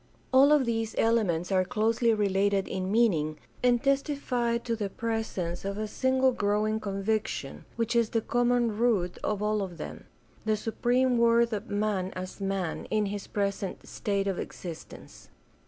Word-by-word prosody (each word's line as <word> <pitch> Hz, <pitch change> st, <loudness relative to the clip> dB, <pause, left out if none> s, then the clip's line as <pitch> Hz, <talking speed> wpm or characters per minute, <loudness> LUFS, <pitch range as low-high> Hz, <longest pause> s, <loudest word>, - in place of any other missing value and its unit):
All 275 Hz, +3 st, +7 dB
of 295 Hz, -3 st, +5 dB
these 225 Hz, -1 st, -1 dB
elements 200 Hz, -7 st, +1 dB
are 185 Hz, -1 st, +3 dB
closely 225 Hz, +4 st, +1 dB
related 200 Hz, -2 st, +1 dB
in 185 Hz, 0 st, -3 dB
meaning 165 Hz, -10 st, +2 dB, 0.2 s
and 245 Hz, 0 st, +3 dB
testify 275 Hz, -4 st, +1 dB
to 235 Hz, 0 st, -3 dB
the 210 Hz, -3 st, -3 dB
presence 210 Hz, -6 st, -3 dB
of 200 Hz, +1 st, -3 dB
a 215 Hz, 0 st, -2 dB
single 260 Hz, +3 st, +2 dB
growing 215 Hz, -1 st, 0 dB
conviction 200 Hz, -7 st, -2 dB
which 230 Hz, +1 st, -1 dB
is 230 Hz, -2 st, +3 dB
the 225 Hz, -, 0 dB
common 240 Hz, -1 st, +1 dB
root 210 Hz, -6 st, +1 dB
of 210 Hz, -1 st, -1 dB
all 210 Hz, 0 st, +1 dB
of 180 Hz, -3 st, -5 dB
them -, -, -8 dB, 0.2 s
— -, -, -31 dB
the 215 Hz, -1 st, +2 dB
supreme 245 Hz, +3 st, +1 dB
worth 235 Hz, 0 st, +4 dB
of 210 Hz, +2 st, -4 dB
man 205 Hz, -2 st, 0 dB
as 185 Hz, +2 st, -7 dB
man 195 Hz, -4 st, -2 dB
in 215 Hz, -1 st, 0 dB
his 205 Hz, -, -6 dB
present 200 Hz, -2 st, -3 dB
state 200 Hz, -1 st, -1 dB
of 195 Hz, -2 st, -1 dB
existence. 170 Hz, -3 st, -9 dB
215 Hz, 160 wpm, -28 LUFS, 195-235 Hz, 0.2 s, All